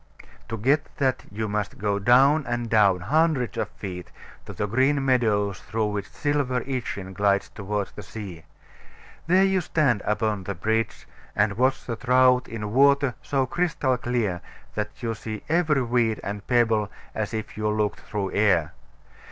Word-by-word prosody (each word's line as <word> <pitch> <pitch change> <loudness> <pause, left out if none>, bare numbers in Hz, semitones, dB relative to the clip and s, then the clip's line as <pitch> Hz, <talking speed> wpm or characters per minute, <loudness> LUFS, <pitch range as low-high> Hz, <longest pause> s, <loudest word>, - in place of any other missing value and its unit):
To 115 - -3
get 140 +8 +2
that 130 -2 0
you 110 +1 -3
must 105 0 -3
go 100 0 0
down 135 +8 +5
and 120 -1 -2
down, 100 -5 +4
hundreds 150 - +1
of - - -2
feet, 90 -3 -7 0.4
to - - -7
the - - -2
green 135 +6 +2
meadows 105 -7 +2
through 110 +1 -2
which 100 -1 -4
silver 145 -4 -1
Itchen 115 -7 -4
glides 100 +1 +1
toward 105 -1 -3
the - - -8
sea. 95 -5 -8 0.8
There 185 +3 +5
you 190 -1 +2
stand 140 - +1
upon 105 -2 -1
the 100 - -3
bridge, 110 +6 -1 0.3
and 105 0 +2
watch 130 +4 +1
the 115 - -3
trout 125 0 +4
in 105 -2 -5
water 140 0 +4
so 140 -3 0
crystal 170 -5 0
clear 115 -7 -1 0.3
that 105 +3 -5
you 115 -1 -1
see 110 -1 -7
every 155 -4 +2
weed 115 -2 +1
and 100 0 -5
pebble 115 -4 +2 0.2
as 105 -1 -3
if 110 -2 -5
you 105 0 -1
looked 105 -1 0
through 100 -3 -4
air. 90 -6 +2
115 Hz, 160 wpm, -25 LUFS, 105-130 Hz, 0.8 s, down